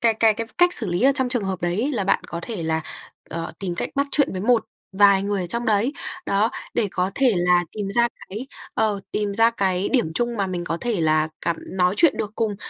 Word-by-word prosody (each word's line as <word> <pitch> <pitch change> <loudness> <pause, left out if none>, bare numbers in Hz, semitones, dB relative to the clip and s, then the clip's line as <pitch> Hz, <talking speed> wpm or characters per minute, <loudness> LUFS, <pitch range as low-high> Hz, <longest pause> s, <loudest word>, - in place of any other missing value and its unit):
cái 230 -1 +3
cái 220 -1 +4
cái 230 +1 -4
cách 355 0 +5
xử 220 - +5
lý 175 +4 -1
ở 275 +2 +6
trong 260 -2 0
trường 245 -4 -1
hợp 190 -2 -3
đấy 175 +4 0
ấy 285 - 0
là 205 -6 -1
bạn 195 - +1
có 170 - -6
thể 215 -8 -5
là, 160 0 0 0.5
ờ, 165 0 -4
tìm 180 -3 -3
cách - - -3
bắt 280 0 +1
chuyện 285 -8 +1
với 185 - -4
một 230 +2 +3 0.3
vài 200 -1 +6
người 200 -1 -1
ở 175 - -4
trong 235 +7 -2
đấy, 220 +5 +2 0.3
đó, 205 +3 +2 0.2
để 220 -4 +1
có 185 +1 0
thể 255 -6 +3
là 175 0 +3
tìm 205 -2 -4
ra 235 0 +4 0.2
cái 220 +7 -6 0.3
ờ, 215 -2 +1
tìm 205 -1 -1
ra 225 +2 +5
cái 190 -4 0
điểm 240 - +1
chung 240 +3 0
mà 195 - +1
mình 180 -2 -4
có 165 - -2
thể 235 -6 -1
là 155 -1 +2
cảm 170 - -1
nói 180 0 +1
chuyện 330 -4 +5
được 210 0 -3
cùng. 215 -3 -1
205 Hz, 250 wpm, -23 LUFS, 180-235 Hz, 0.5 s, ở